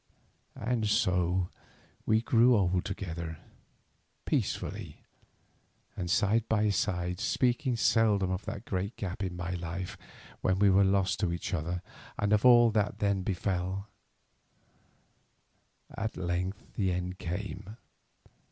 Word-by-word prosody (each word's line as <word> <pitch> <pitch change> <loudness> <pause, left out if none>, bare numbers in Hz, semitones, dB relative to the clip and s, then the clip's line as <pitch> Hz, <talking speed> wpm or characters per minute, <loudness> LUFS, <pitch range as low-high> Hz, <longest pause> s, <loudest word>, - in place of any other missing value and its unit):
And 115 -1 0
so 90 -2 +2 0.6
we 110 0 +4
grew 120 0 +5
old 90 -2 +1
together, 85 -5 -5 0.9
peacefully, - - -2 1.0
and 90 -2 -4
side 110 +2 +2
by 105 -1 +3
side, 90 -3 -1
speaking 125 +2 +1
seldom 105 -5 +3
of 95 +2 -2
that 100 - -6
great 95 +3 -2
gap 95 0 -5
in 95 -2 -2
my 90 0 -4
life 90 +1 -4 0.4
when 95 - +2
we 100 0 +5
were 95 +1 +5
lost 95 -1 +2
to 95 -5 +1
each 85 +3 -4
other 90 +1 -2 0.3
and 105 0 +1
of 105 - +3
all 120 -2 +7
that 105 -2 0
then 100 -2 +1
befell. 95 +1 -2 2.1
At 110 +2 -3
length 90 +4 -3
the 95 -4 0
end 90 +1 -3
came. 95 +4 -5
95 Hz, 125 wpm, -30 LUFS, 90-105 Hz, 2.1 s, all